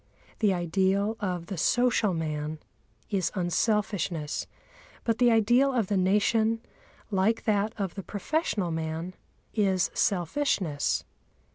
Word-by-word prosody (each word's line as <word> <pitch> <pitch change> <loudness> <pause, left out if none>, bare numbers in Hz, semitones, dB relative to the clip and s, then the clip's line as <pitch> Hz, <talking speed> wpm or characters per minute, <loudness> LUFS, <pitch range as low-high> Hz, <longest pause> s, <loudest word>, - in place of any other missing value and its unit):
The 210 -3 +3
ideal 190 +4 +1
of 180 -4 -2
the 190 +1 -6
social 245 -2 +3
man 155 -1 -3 0.5
is 185 -5 0
unselfishness, 180 -4 0 0.6
but 230 0 0
the 245 -1 +5
ideal 240 +4 +4
of 225 -6 +1
the 205 - +1
Nation, 210 +4 +2 0.5
like 200 +3 +2
that 210 0 +1
of 195 -4 -2
the 195 - -5
professional 205 - -1
man, 160 +2 -3 0.4
is 190 -4 +2
selfishness. 180 - 0
195 Hz, 115 wpm, -28 LUFS, 175-220 Hz, 0.6 s, the